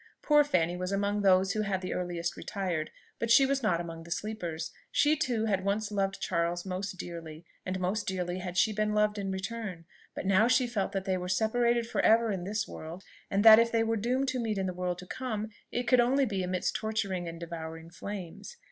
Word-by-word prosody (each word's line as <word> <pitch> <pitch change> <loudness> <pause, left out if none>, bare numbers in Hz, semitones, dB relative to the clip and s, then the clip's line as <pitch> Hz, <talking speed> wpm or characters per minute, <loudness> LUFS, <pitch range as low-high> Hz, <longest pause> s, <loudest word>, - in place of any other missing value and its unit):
Poor 295 -1 +6
Fanny 175 - +1
was 180 +1 -3
among 200 +1 0
those 190 0 +4
who 215 - 0
had 200 -2 -1
the 185 -1 -4
earliest 175 -1 -3
retired, 180 -6 -3 0.3
but 230 - -2
she 270 +4 +7
was 275 0 0
not 210 -7 +1
among 165 -1 -6
the 165 - -12
sleepers. 170 -5 -4 0.2
She 300 +1 +4
too 245 -8 0
had 195 -3 0
once 205 +2 -1
loved 195 -1 -1
Charles 170 0 -1
most 190 +1 -4
dearly, 165 -2 -8 0.2
and 185 0 -2
most 190 +4 -1
dearly 180 -1 -2
had 180 0 -5
she 220 - +3
been 210 0 0
loved 210 0 +2
in 195 -1 -3
return. 190 -2 -5 0.3
But - - -5
now 195 +4 +4
she 255 +1 +4
felt 210 -6 -2
that 195 -1 -2
they 190 -2 +1
were 180 0 -5
separated 235 +4 +2
for - - 0
ever 225 0 +4
in 185 -3 -3
this 210 +2 -2
world, 165 +4 -8 0.3
and 200 +2 +1
that 220 0 +11
if 230 0 +3
they 230 -1 +2
were 225 0 0
doomed 250 +5 0
to 255 -1 -2
meet 220 -3 -1
in 190 - 0
the 185 - -2
world 180 0 -2
to 180 - -9
come, 220 -1 -4 0.2
it 245 - -1
could 245 +1 +4
only 265 +3 +4
be 200 -5 -2
amidst 185 0 -1
torturing 200 -5 -2
and 165 0 -7
devouring 165 -1 -7
flames. 195 - -7
195 Hz, 220 wpm, -30 LUFS, 180-220 Hz, 0.3 s, that